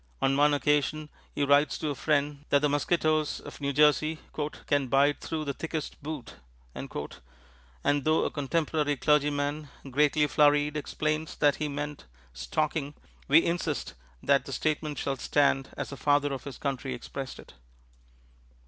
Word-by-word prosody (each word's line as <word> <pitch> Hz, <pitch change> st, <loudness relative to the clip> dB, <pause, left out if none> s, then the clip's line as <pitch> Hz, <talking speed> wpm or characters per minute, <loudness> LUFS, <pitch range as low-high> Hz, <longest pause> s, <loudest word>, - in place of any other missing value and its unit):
On 135 Hz, 0 st, +2 dB
one 145 Hz, +1 st, +4 dB
occasion 150 Hz, +1 st, 0 dB, 0.3 s
he 145 Hz, -, 0 dB
writes 145 Hz, +1 st, +4 dB
to 155 Hz, -, -2 dB
a -, -, -1 dB
friend 145 Hz, 0 st, 0 dB
that 140 Hz, 0 st, +3 dB
the 150 Hz, -, +4 dB
mosquitoes 155 Hz, +1 st, +1 dB
of -, -, -11 dB
New 140 Hz, 0 st, 0 dB
Jersey 150 Hz, +2 st, +3 dB, 0.5 s
"can 145 Hz, -2 st, +1 dB
bite 140 Hz, +3 st, +3 dB
through 155 Hz, -1 st, -3 dB
the 140 Hz, -, -2 dB
thickest 160 Hz, +1 st, -5 dB
boot," 145 Hz, -, -7 dB, 0.4 s
and -, -, -7 dB, 1.1 s
though 155 Hz, +2 st, +3 dB
a -, -, -1 dB
contemporary 150 Hz, 0 st, 0 dB
clergyman, 145 Hz, +1 st, +1 dB, 0.2 s
greatly 150 Hz, +2 st, +3 dB
flurried, 145 Hz, 0 st, +3 dB
explains 155 Hz, +1 st, -2 dB
that 145 Hz, -2 st, +3 dB
he 155 Hz, -, -2 dB
meant 145 Hz, 0 st, -5 dB, 0.3 s
"stocking," 145 Hz, -, -2 dB, 0.3 s
we 155 Hz, +4 st, +6 dB
insist 170 Hz, +1 st, -2 dB, 0.3 s
that 140 Hz, -2 st, +3 dB
the 135 Hz, -, -6 dB
statement 150 Hz, +1 st, -1 dB
shall 135 Hz, -1 st, -2 dB
stand 135 Hz, 0 st, +2 dB
as -, -, -4 dB
the 140 Hz, -, -7 dB
Father 145 Hz, 0 st, +2 dB
of 135 Hz, -, -6 dB
his 140 Hz, -4 st, -7 dB
Country 135 Hz, -2 st, -3 dB
expressed 135 Hz, +2 st, -7 dB
it. -, -, -14 dB
145 Hz, 150 wpm, -28 LUFS, 140-155 Hz, 1.1 s, we